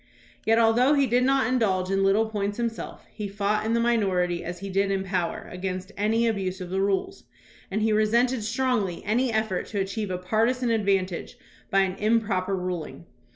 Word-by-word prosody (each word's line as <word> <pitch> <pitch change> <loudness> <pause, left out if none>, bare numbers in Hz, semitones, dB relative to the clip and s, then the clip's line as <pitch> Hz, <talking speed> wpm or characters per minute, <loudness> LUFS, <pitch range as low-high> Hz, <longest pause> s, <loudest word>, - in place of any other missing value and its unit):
Yet 225 0 +5
al 225 -1 +5
though 255 +5 +4
he 280 -1 +3
did 250 0 +2
not 270 +1 +3
indulge 195 -7 +1
in 195 0 +2
little 200 +3 +3
points 205 -2 -3
himseK, 235 -1 -4
he 210 -2 -4
fought 205 +2 -1
in 225 - +1
the 235 - +2
minority 190 -7 +1
as 175 +1 -5
he 195 +3 -7
did 195 +1 +1
in 195 -1 0
power 185 -3 -2
against 185 0 -4
any 220 +3 +1
abuse 195 -4 -1
of 180 -1 -7
the 190 +1 0
rules, 200 - -1 0.4
and 210 +2 -1
he 220 -1 +2
resented 230 +3 +2
strongly 230 -5 -1
any 240 +4 +1
effort 220 -4 -1
to 205 - -3
achieve 195 +2 -2
a 180 - -2
partisan 230 +6 +1
advantage 195 -1 0 0.3
by 195 - +3
an 190 -1 0
improper 205 -3 +1
ruling. 180 -3 -5
210 Hz, 190 wpm, -26 LUFS, 190-230 Hz, 0.4 s, Yet